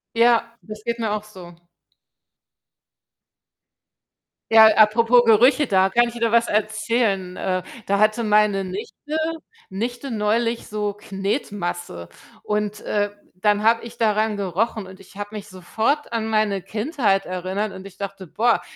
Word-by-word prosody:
Ja, 230 0 +3
das 215 0 -10
geht 235 0 -1
mir 220 -2 -2
auch 210 0 -2
so. 180 -4 -12 3.0
Ja, 220 0 +9
apropos 230 +3 +5
Gerüche, 250 +6 +5
da 190 -3 +3
kann 240 +4 +3
ich 235 - -7
wieder 230 -1 0
was 235 0 +3
erzählen. 215 -3 0
Äh, 185 -1 -2 0.2
da 200 0 +1
hatte 215 +2 +2
meine 210 -2 +3
Nichte 210 +11 -6 0.5
Nichte 240 +6 -4
neulich 230 +2 0
so 210 -1 -2
Knetmasse 195 - -4 0.3
und, 210 0 -2
äh, 205 0 -1 0.2
dann 205 +3 +1
habe 230 +1 +3
ich 235 0 -10
daran 215 -1 +1
gerochen 200 +2 -2
und 190 +1 -13
ich 195 +1 -17
habe 205 0 -5
mich 210 0 -7
sofort 220 - -2
an 220 -1 -1
meine 215 -3 +1
Kindheit 210 - 0
erinnert 185 +3 -3
und 190 +1 -10
ich 195 - -16
dachte: 195 -2 -7
„Boah, 230 +7 +1
210 Hz, 140 wpm, -22 LUFS, 195-230 Hz, 3.0 s, Ja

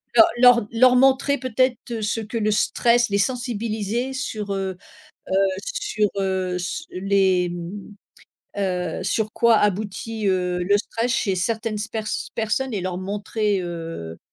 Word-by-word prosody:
leur 225 - +9 0.2
leur 245 -4 +6
leur 250 +2 +5
montrer 270 +2 +4
peut-être 255 -1 +1 0.2
ce 215 +2 -1
que 220 +2 -5
le 215 -1 +1
stress, 235 +3 +2
les 200 - +1
sensibiliser 235 0 -2
sur, 210 -6 -3
heu 190 -1 -3 0.6
heu, 195 - +4 0.2
sur, 415 - -1
heu, 190 -2 -1
s 180 +1 -4
les, 190 -1 +2
hem, 175 +4 -7 1.0
heu, - - -4
sur 215 +3 -1
quoi 235 -1 +4
aboutit, 210 +1 -1
heu, 180 -1 0
le 200 +3 +3
stress 230 +3 -2
chez 195 -6 0
certaines 220 +3 -1
sper 220 0 -4 0.3
personnes 235 +4 -1
et 195 - -1
leur 180 0 -3
montrer, 205 +1 -1
heu 165 - -6
210 Hz, 140 wpm, -23 LUFS, 190-235 Hz, 1.0 s, leur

